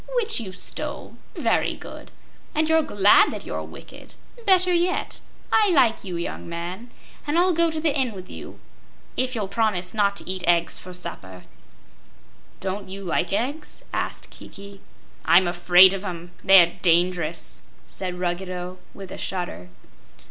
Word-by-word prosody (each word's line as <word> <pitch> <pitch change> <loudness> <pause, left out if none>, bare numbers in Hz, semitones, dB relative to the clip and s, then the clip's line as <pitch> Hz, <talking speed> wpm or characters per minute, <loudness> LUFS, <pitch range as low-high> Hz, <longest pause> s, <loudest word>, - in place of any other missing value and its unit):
"Which 455 - +1
you 205 -5 -6
stole. 185 - -3 0.2
Very - - +1
good. - - -11 0.5
And 310 +1 +2
you're 320 0 +4
glad 205 -9 +5
that - - -6
you're - - -4
wicked. - - -12 0.3
Better 365 -1 +5
yet. 350 +1 0 0.3
I 425 -2 +5
like 265 -10 +3
you, 180 -3 -5
young 170 - -5
man, 175 +7 -6 0.4
and 295 +3 +1
I'll 360 +1 +4
go 335 0 +3
to 320 -1 -3
the 310 -2 +1
inn 260 -5 +1
with 185 -2 -9
you - - -10 0.6
if 255 0 -1
you'll 210 -4 -2
promise 195 -3 -1
not 200 -2 +2
to - - -7
eat 185 -1 -2
eggs 170 -1 +2
for 185 - -10
supper." 170 - -6 1.2
"Don't 195 +1 -4
you 195 +1 -6
like 175 -1 -1
eggs?" 280 +9 -3
asked - - -3
Kiki. 200 0 -11 0.4
"I'm 180 +1 +5
afraid 180 +2 +6
of 195 0 -4
'em; 175 -2 -6
they're 180 -3 +6
dangerous!" 175 -2 +1 0.2
said 180 -2 -5
Ruggedo, 180 0 -4 0.2
with 195 -2 -9
a - - -7
shudder. 90 - -4
190 Hz, 155 wpm, -24 LUFS, 180-255 Hz, 1.2 s, afraid